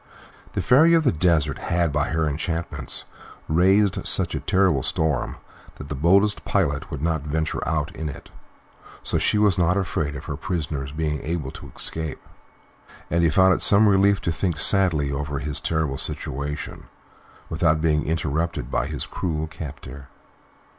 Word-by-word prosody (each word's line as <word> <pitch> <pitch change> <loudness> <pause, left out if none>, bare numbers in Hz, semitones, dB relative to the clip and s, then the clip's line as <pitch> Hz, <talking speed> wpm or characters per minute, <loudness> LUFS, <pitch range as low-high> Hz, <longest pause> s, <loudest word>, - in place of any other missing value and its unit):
The - - -2
Fairy 160 +7 +5
of 165 - +3
the 140 - +3
Desert 80 -3 +1
had 85 -3 0
by 75 0 0
her 80 0 0
enchantments 80 +3 -4 0.4
raised 95 +5 +2
such - - +6
a - - -2
terrible 95 -8 +2
storm 75 -3 0 0.4
that 75 - -10
the - - -3
boldest 95 +8 +2
pilot 70 +1 -1
would 75 0 -6
not 80 -2 0
venture 80 +2 -2
out 75 +1 -2
in 80 -1 -4
it, 70 0 -11 0.7
so - - -1
she - - +1
was 105 -4 +3
not 90 +2 +2
afraid 75 -5 -2
of 75 - -8
her 75 - -4
prisoner's 75 -5 -4
being 75 -1 -2
able 75 -4 -4
to 70 - -11
escape; 80 -2 -4 0.9
and 85 +1 +2
he 85 - +4
found 95 +4 +4
it - - -2
some 105 +2 +6
relief 100 0 +4
to 85 - -1
think 85 0 -2
sadly 80 -5 +3
over 70 0 -3
his 75 +2 -1
terrible 80 -4 -1
situation 70 +3 -3 0.6
without 80 -1 +1
being 75 -1 +1
interrupted 80 0 -2
by 60 - 0
his 75 -2 -4
cruel 80 -4 -3
captor. 70 -4 -9
80 Hz, 160 wpm, -23 LUFS, 75-90 Hz, 0.9 s, such